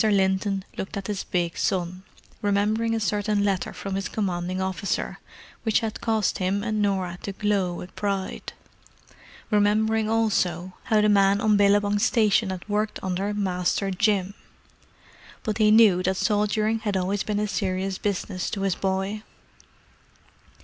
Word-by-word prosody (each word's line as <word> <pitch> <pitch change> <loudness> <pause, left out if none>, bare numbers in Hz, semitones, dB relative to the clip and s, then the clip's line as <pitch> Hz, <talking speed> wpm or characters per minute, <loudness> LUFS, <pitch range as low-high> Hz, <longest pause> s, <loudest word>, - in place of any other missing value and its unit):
Linton 195 -1 +1
looked 195 - -4
at 195 - -5
his 205 -2 -3
big 175 -2 -1
son, 185 0 -1 0.4
remembering 215 +3 +1
a - - 0
certain 205 0 0
letter 195 -2 0
from 195 - -6
his 195 -1 -2
commanding 185 -3 -2
officer 190 +1 -2 0.4
which 220 -2 +2
had 220 -2 -4
caused 220 -3 0
him 195 +2 0
and 215 -1 -1
Norah 190 -3 -1
to 200 - -5
glow 195 -3 0
with 180 - -9
pride; 195 -2 -3 1.0
remembering, 215 +1 +2
also, 185 -6 0
how 215 -3 +3
the 210 - +3
men 200 -1 +4
on 215 -1 +3
Billabong 205 0 +3
Station 215 -3 +3
had 185 0 -6
worked 210 +1 -1
under 190 +2 -1
"Master 195 -1 0
Jim." 200 0 +1 1.1
But 215 0 -2
he 215 -1 +5
knew 210 -4 +6
that 190 +1 0
soldiering 215 +1 +1
had 205 -3 -1
always 190 +2 -1
been 210 -1 -1
a 210 - 0
serious 190 0 -2
business 190 -2 -2
to 200 - -4
his 195 -1 +1
boy. 195 +3 -2
200 Hz, 150 wpm, -25 LUFS, 190-210 Hz, 1.1 s, knew